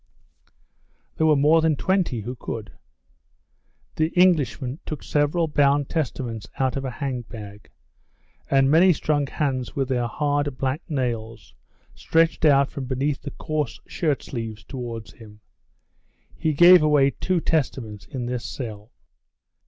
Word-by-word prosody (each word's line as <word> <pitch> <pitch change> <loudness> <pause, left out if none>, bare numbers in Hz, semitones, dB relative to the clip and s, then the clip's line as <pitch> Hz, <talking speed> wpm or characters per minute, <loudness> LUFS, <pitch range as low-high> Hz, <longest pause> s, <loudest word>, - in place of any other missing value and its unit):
There 160 - +2
were 155 - +5
more 150 +3 +4
than 160 -1 +2
20 180 - 0
who 120 +4 -5
could. 115 -3 -6 1.3
The 155 - +2
Englishman 145 -6 +2
took 155 - -6
several 150 +3 +1
bound 145 -2 +2
Testaments 120 -8 -3
out 130 -1 0
of 135 - -3
a 130 - -2
hang 130 -1 -4
bag, 105 -3 -11 0.8
and 135 0 +4
many 175 +4 +6
strong 145 -2 0
hands 130 -4 -2
with 135 -1 -1
their 120 -2 0
hard, 145 +2 -1
black 135 +4 -1
nails 115 -6 -3 0.4
stretched 165 0 +1
out 140 -2 +4
from 135 - -5
beneath 135 +2 -1
the 145 - -6
coarse 150 -3 -3
shirt 150 -6 -1
sleeves 110 -4 -6
towards 120 -4 -7
him. 105 -2 -15 1.0
He 155 - 0
gave 175 +3 +8
away 145 -2 +4
two 185 +4 -1
Testaments 125 -10 -2
in 130 -5 -5
this 125 -1 -3
cell. 110 -4 -7
135 Hz, 135 wpm, -24 LUFS, 120-155 Hz, 1.3 s, gave